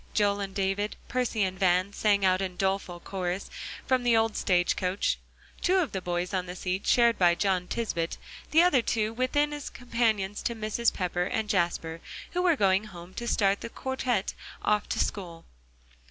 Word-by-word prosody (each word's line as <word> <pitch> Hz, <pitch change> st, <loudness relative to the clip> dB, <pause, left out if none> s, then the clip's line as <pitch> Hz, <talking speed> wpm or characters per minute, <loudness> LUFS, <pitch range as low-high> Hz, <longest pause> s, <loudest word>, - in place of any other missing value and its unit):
Joel 205 Hz, -1 st, +2 dB
and 195 Hz, -1 st, -5 dB
David, 200 Hz, +1 st, -1 dB
Percy 245 Hz, -4 st, 0 dB
and 185 Hz, -1 st, -2 dB
Van 185 Hz, +1 st, +2 dB
sang 200 Hz, -2 st, +2 dB
out 185 Hz, 0 st, +3 dB
in 185 Hz, -2 st, -3 dB
doleful 190 Hz, -1 st, -1 dB
chorus, 185 Hz, 0 st, -3 dB, 0.3 s
from 260 Hz, -1 st, +2 dB
the 240 Hz, -2 st, +4 dB
old 225 Hz, -1 st, +1 dB
stage 175 Hz, -1 st, +2 dB
coach; 185 Hz, +2 st, 0 dB, 0.4 s
two 370 Hz, -, +3 dB
of 355 Hz, -6 st, +1 dB
the 190 Hz, -, -3 dB
boys 175 Hz, +1 st, -2 dB
on 185 Hz, -1 st, -1 dB
the 180 Hz, -, -6 dB
seat 185 Hz, +1 st, -3 dB
shared 235 Hz, -2 st, +4 dB
by 175 Hz, -2 st, +5 dB
John 185 Hz, -2 st, 0 dB
Tisbett, 170 Hz, -8 st, -2 dB, 0.3 s
the 325 Hz, +2 st, +6 dB
other 295 Hz, -8 st, +4 dB
two 220 Hz, -1 st, 0 dB
within 290 Hz, +5 st, +1 dB
as 290 Hz, -1 st, -5 dB
companions 220 Hz, -5 st, -1 dB
to 235 Hz, -, -2 dB
Mrs. 220 Hz, +1 st, +1 dB
Pepper 180 Hz, -1 st, -1 dB
and 220 Hz, +3 st, -1 dB
Jasper, 170 Hz, -4 st, 0 dB, 0.3 s
who 360 Hz, -, 0 dB
were 355 Hz, -3 st, +4 dB
going 195 Hz, -3 st, +3 dB
home 175 Hz, -3 st, -11 dB
to 240 Hz, +3 st, -5 dB
start 200 Hz, -3 st, +2 dB
the -, -, -5 dB
quartette 255 Hz, -5 st, -1 dB, 0.3 s
off 210 Hz, 0 st, +1 dB
to -, -, -1 dB
school. 170 Hz, -5 st, -3 dB
200 Hz, 185 wpm, -28 LUFS, 185-235 Hz, 0.4 s, the